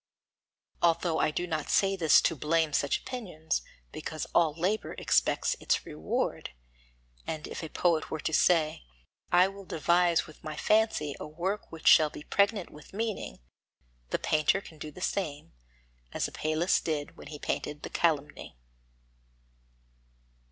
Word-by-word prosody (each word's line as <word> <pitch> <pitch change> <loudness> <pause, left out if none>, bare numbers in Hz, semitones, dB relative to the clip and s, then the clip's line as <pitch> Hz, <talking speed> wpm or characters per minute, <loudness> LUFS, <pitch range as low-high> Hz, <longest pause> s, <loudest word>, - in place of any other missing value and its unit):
Although 170 -1 +2
I - - +3
do 175 +3 -2
not 155 -4 -3
say 195 0 +3
this 165 -5 +5
to 165 - +2
blame 155 +1 +1
such 140 0 +1
opinions, 175 - -3 0.3
because 155 - -5
all 165 -3 +4
labour 195 +5 0
expects - - +1
its - - 0
reward; 75 +1 -2 0.8
and 155 -1 -4
if - - -6
a 160 - -6
poet 170 -2 +1
were 155 - -3
to 160 - -2
say: 160 -2 +3 0.5
"I 180 +1 +6
will 195 0 -9
devise 170 0 +2
with 155 -3 -15
my 155 -1 -5
fancy 215 -10 +2
a - - -6
work 175 +7 -3
which 165 - -10
shall 155 -1 +8
be 150 - -10
pregnant 200 0 +1
with 150 +4 -14
meaning," 215 - -3 0.7
the - - 0
painter 155 +5 +2
can 160 -5 -14
do 155 - -6
the 165 +5 -12
same, 150 - -3 0.6
as - - -1
Apelles 155 +4 +1
did 150 -3 -3
when - - -12
he 150 - -7
painted 150 0 -3
The - - -6
Calumny. 150 - -1
160 Hz, 150 wpm, -29 LUFS, 155-180 Hz, 0.8 s, shall